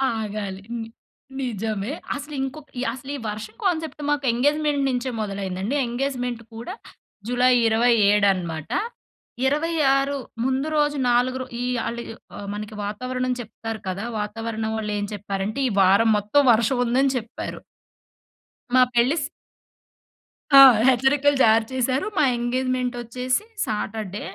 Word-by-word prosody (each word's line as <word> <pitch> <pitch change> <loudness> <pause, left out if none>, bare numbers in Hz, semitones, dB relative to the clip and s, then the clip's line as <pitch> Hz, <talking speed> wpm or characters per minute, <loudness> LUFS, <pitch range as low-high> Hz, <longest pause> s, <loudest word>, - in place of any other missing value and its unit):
ఆగాలి. 205 -3 -4
హ్మ్. 230 -1 -4 0.5
నిజమే. 220 -4 -3 0.2
అసలు 290 +1 -7
ఇంకొక్ 275 +3 -5 0.2
అసలీ 265 +3 -7 0.2
వర్షం 215 +1 -6
కాన్సెప్ట్ 320 -4 -1
మాకు 290 -1 0
ఎంగేజ్‌మెంట్ 290 +3 +1
నించే 255 0 -1
మొదలైందండి. 195 +3 -3
ఎంగేజ్‌మెంట్ 245 -1 -2
కూడా 235 +11 -6 0.5
జులై 250 +1 +3
27 220 -3 +4
అనమాట. 165 -4 -5 0.8
26 285 -2 +2 0.3
ముందు 265 +3 0
రోజు 295 -1 +2
నాలుగురు, 255 +2 +1 0.2
ఈ - - -1 0.2
ఆళ్ళు 235 +1 -3
య్ - - -6 0.2
ఆహ్, 205 - -7
మనకి 210 +1 -6
వాతావరణం 255 +5 -2
చెప్తారు 225 -1 -6
కదా! 190 +2 -3 0.2
వాతావరణం 220 +1 -3
వాళ్ళేం 210 -1 -2
చెప్పారంటే, 200 +3 -3
ఈ - - -1
వారం 200 +4 +5
మొత్తం 210 +8 +3
వర్షవుందని 245 +3 +2
చెప్పారు. 230 -1 -6 1.1
మా 255 - +6
పెళ్లి 240 +5 +3
స్ - - -1 1.3
ఆ! 275 - +11 0.3
హెచ్చరికలు 270 +3 +3
జారీ 220 0 +5
చేశారు. 260 - 0
మా 300 - +4
ఎంగేజ్‌మెంటొచ్చేసి 250 - -1 0.2
సాటర్‌‌డే. 210 -2 -4
240 Hz, 115 wpm, -23 LUFS, 215-265 Hz, 1.3 s, ఆ